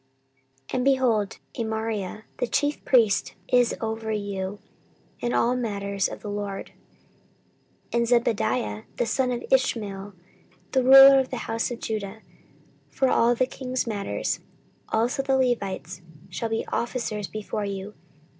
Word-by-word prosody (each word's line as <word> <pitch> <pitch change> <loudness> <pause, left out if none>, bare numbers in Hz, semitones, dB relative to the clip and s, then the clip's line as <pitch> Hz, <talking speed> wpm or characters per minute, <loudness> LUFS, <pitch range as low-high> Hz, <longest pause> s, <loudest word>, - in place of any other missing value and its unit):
14:019:011 - - -9
And, 250 - 0
behold, 250 -7 +2 0.2
Amariah 220 -3 -3 0.2
the 245 - 0
chief 290 +4 0
priest 225 -6 +3
is 245 -1 +3
over 220 0 -3
you 200 -2 -3 0.6
in 240 - -1
all 245 +1 +2
matters 200 -5 -1
of - - -8
the - - -7
LORD; 205 -1 -4 1.2
and 235 0 +2
Zebadiah 125 - +1
the 240 - +1
son 255 +3 +1
of 240 - -3
Ishmael, 205 -7 0 0.6
the 260 -1 +2
ruler 270 +1 +10
of 260 - -1
the 255 - -4
house 225 0 -1
of 240 -1 -6
Judah, 215 -1 -4 0.7
for 265 - +1
all 235 +1 +4
the 255 - +2
king's 255 -1 -3
matters: 205 -4 -2 0.5
also 235 +4 +1
the 270 0 +1
Levites 205 -8 -1 0.3
shall 225 +5 -3
be 225 0 -1
officers 225 -4 -2
before 215 0 -4
you. 200 +1 -5
225 Hz, 135 wpm, -25 LUFS, 205-250 Hz, 1.2 s, ruler